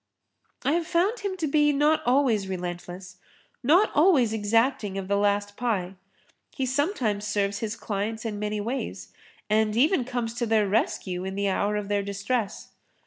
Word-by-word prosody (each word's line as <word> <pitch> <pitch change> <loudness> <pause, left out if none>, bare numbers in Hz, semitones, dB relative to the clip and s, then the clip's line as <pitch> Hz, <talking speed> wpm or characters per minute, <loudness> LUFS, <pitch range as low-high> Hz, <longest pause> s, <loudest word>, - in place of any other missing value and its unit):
I 275 - +3
have 335 +1 0
found 390 +8 +1
him 395 -2 -3
to 335 - -1
be 295 0 +3
not 295 +2 +2
always[Pg 245 -5 +3
28] - - -8
relentless, 180 0 -6 0.4
not 345 - +4
always 290 - +4
exacting 220 -1 +1
of 195 -1 -4
the 200 - +1
last 205 0 +1
pie. 205 -7 -1 0.6
He 265 - -3
sometimes 255 - -1
serves 200 -1 0
his 220 -1 -3
clients 220 +2 -4
in 210 -2 -3
many 210 0 -2
ways 240 +6 -4 0.3
and 215 0 +1
even 290 +3 +3
comes 240 -2 -3
to 240 - 0
their 215 -2 +3
rescue 190 -3 -1
in 190 0 -4
the 200 0 0
hour 205 +2 0
of 210 -1 -3
their 205 0 +1
distress. 200 +2 -3
215 Hz, 170 wpm, -26 LUFS, 200-265 Hz, 0.6 s, not